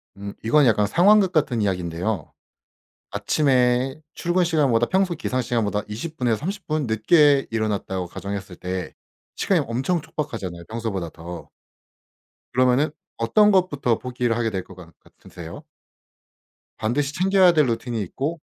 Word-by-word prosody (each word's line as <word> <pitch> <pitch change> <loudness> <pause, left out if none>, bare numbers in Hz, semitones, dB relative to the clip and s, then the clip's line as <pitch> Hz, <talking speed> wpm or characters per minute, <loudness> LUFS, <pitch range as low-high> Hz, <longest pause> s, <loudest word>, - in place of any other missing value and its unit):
음 100 0 -7
이건 145 +6 +4
약간 105 -3 +3
상황극 190 - +5
같은 150 -9 +1
이야기인데요. 90 -1 -2 0.8
아침에 125 +4 +1
출근 175 +1 +1
시간보다 145 -9 +2
평소 190 -2 +1
기상 130 -5 -2
시간보다 110 -4 -1
20 140 +10 -6
분에서 120 -3 +1
30 195 +6 -5
분 155 -2 -1
늦게 140 +5 +4
일어났다고 105 -4 -2
가정했을 100 +1 -6
때 90 0 -5 0.4
시간이 - - +2
엄청 135 +9 0
촉박하잖아요 105 - -5
평소보다 110 -7 -4
더. 85 +1 -9 1.0
그러면은 130 +4 +3 0.3
어떤 210 - +4
것부터 145 - +2
포기를 125 -2 -2
하게 115 -1 0
될 95 -2 -3
것 95 - -14
간 85 -2 -13
같으세요? - - -12 1.2
반드시 140 +6 -1
챙겨야 190 +1 +4
될 155 -3 +4
루틴이 115 -1 -2
있고 145 - -4
120 Hz, 315 characters per minute, -23 LUFS, 105-150 Hz, 1.2 s, 상황극